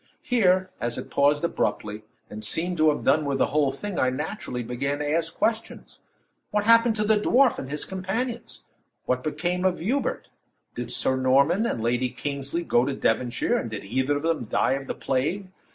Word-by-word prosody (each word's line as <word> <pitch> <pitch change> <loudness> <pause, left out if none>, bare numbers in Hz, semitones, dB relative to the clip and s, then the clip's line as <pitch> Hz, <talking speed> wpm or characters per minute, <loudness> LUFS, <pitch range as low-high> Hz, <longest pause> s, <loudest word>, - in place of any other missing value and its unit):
Here, 185 -6 +2
as 120 0 -2
it - - -7
paused 145 +2 +3
abruptly, 105 -10 -1 0.3
and 105 +1 -8
seemed 175 +10 -1
to 155 0 +5
have 150 - -1
done 155 +1 +3
with 140 -2 -1
the - - +3
whole 145 -3 +3
thing, 195 +7 -5
I 130 - +3
naturally 130 - -4
began 140 +5 -2
to 145 0 -3
ask 165 +2 0
questions. 225 0 -2 0.5
What 210 -1 0
happened 230 +1 +5
the 210 0 +2
dwarf 250 +4 +3
and 130 - -6
his 150 +1 -3
companions? 220 +6 -4 0.4
What 125 0 0
became 175 +4 -1
of 185 -1 +2
Hubert? 250 +11 -2 0.4
Did - - -5
Sir 130 - +1
Norman 140 - +3
and 115 - -2
Lady 125 +2 +1
Kingsley 140 +5 -4
go 120 -6 +3
to 135 +1 -2
Devonshire, 120 +1 0
and 115 - -3
did 110 -2 -6
either 130 +7 0
of 145 - -6
them 165 -7 0
die 110 - +1
of 135 0 -4
the - - -3
plague? 160 +9 -1
150 Hz, 185 wpm, -25 LUFS, 130-190 Hz, 0.5 s, to